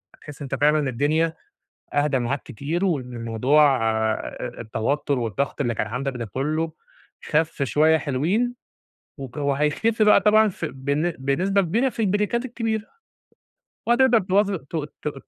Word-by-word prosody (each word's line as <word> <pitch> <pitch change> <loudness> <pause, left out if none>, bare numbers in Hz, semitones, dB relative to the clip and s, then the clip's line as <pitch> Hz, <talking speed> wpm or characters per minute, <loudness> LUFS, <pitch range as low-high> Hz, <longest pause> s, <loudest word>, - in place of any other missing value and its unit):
هتحس 145 -1 -12
إن 140 - -5
أنت - - -3
فعلًا 150 -1 +3
الدنيا 155 +6 +1 0.6
أهدى 145 -2 +2
معاك 125 +3 -2
كتير، 150 - -3
وإن 125 -9 -2
موضوع 135 +5 +4
آآ 110 0 -3
التوتر 130 +6 -1
والضغط 120 +5 -2
اللي 120 -4 0
كان 105 - -2
عندك 130 +4 -3
ده 120 - -4
كله 155 +8 -2 0.5
خف 155 -2 0
شوية 155 +4 +3
حلوين. 175 - 0 0.6
وك 135 0 -8
وهيخف 150 +11 +1
بقى 210 0 +6
طبعًا 215 0 +5
ف 175 - -6
بن 145 +4 -1
بنسبة 180 +10 +1
كبيرة 220 +9 +1
في 235 - -4
البريكات 210 +4 0
الكبيرة، 225 -3 -2 1.1
وهتقدر 240 0 +5
تواظب 200 +1 +1
ت - - -6 0.3
ت 150 - -2
150 Hz, 140 wpm, -23 LUFS, 135-195 Hz, 1.1 s, بقى